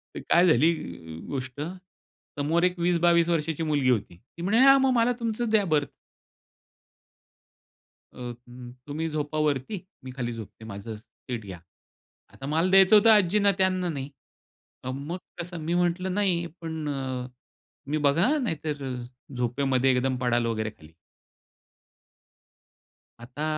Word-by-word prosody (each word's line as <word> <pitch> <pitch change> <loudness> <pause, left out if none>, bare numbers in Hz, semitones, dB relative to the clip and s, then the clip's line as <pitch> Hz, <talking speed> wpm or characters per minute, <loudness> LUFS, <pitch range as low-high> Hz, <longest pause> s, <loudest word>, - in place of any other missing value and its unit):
तर - - -4
काय 175 +2 +5
झाली 160 +2 +5 0.6
गोष्ट 130 0 -5 0.8
समोर 160 +4 +1
एक 180 0 +1
20-22 170 -1 +3
वर्षाची 165 -1 0
मुलगी 145 -4 +1
होती. 105 -8 0 0.2
ती - - -7
म्हणे, 210 +5 +2
"हां, 275 +1 +8
मग 265 0 +3
मला 235 +1 +3
तुमचं 230 0 -2
द्या 215 -2 +3
बर्थ" 150 -4 +1 2.2
"अ, - - -17
उम्म, 120 0 -9 0.2
तुम्ही 155 +3 -3
झोपा 150 0 -3
वरती, 150 - -3 0.2
मी 130 - -7
खाली 120 -3 -3
झोपते.,माझं 110 -1 -8
सीट 115 +1 -8
घ्या." 95 -3 -8 0.7
आता 135 - -9
मला 165 +5 +1
द्यायचं 195 +2 +7
होतं 215 +2 +6
आजींना, 205 0 +4
त्यांना 185 -2 +1
नाही. 140 -3 -4 0.7
अ, 130 - -4
मग 145 +7 -5 0.2
कसं 175 0 -5
मी 170 - 0
म्हटलं, 180 +1 0
"नाही," 185 -4 +1 0.2
पण 160 -2 -4
अ, 130 -3 -3 0.6
मी, 150 +2 0
"बघा, 150 +5 +3
अं, 295 - -1
नाहीतर 155 - -3 0.5
झोपेमध्ये 130 +2 +1
एकदम 130 0 0
पडाल 120 -1 +2
वगैरे 110 -1 -1
खाली." 80 -6 -18 2.3
आता 125 +5 -7
155 Hz, 135 wpm, -26 LUFS, 130-180 Hz, 2.3 s, हां